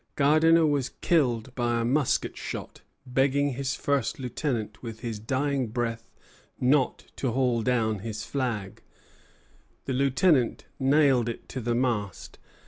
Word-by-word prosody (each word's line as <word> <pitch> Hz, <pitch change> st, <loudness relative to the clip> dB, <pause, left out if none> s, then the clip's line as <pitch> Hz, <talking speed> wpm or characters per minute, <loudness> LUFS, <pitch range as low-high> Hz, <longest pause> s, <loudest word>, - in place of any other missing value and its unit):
Gardiner 160 Hz, +3 st, +5 dB
was 145 Hz, -4 st, +1 dB
killed 125 Hz, -7 st, 0 dB
by 120 Hz, -2 st, 0 dB
a 115 Hz, -, 0 dB
musket 135 Hz, +2 st, +1 dB
shot, -, -, -7 dB, 0.2 s
begging 135 Hz, +2 st, +2 dB
his 130 Hz, +1 st, -2 dB
first 140 Hz, -5 st, 0 dB
lieutenant 125 Hz, -4 st, -3 dB
with 115 Hz, -2 st, -8 dB
his 115 Hz, -4 st, -4 dB
dying 135 Hz, +3 st, -1 dB
breath 115 Hz, 0 st, -3 dB, 0.5 s
not 130 Hz, +1 st, +2 dB
to 130 Hz, -, -1 dB
haul 125 Hz, -2 st, +1 dB
down 110 Hz, -3 st, +1 dB
his 110 Hz, +1 st, -5 dB
flag. 115 Hz, -8 st, -3 dB, 1.0 s
The 135 Hz, -, -2 dB
lieutenant 135 Hz, +1 st, +2 dB
nailed 135 Hz, -3 st, +3 dB
it 115 Hz, -, -7 dB
to 130 Hz, -, -5 dB
the 120 Hz, +1 st, 0 dB
mast. 115 Hz, -6 st, -2 dB
125 Hz, 135 wpm, -27 LUFS, 115-140 Hz, 1.0 s, Gardiner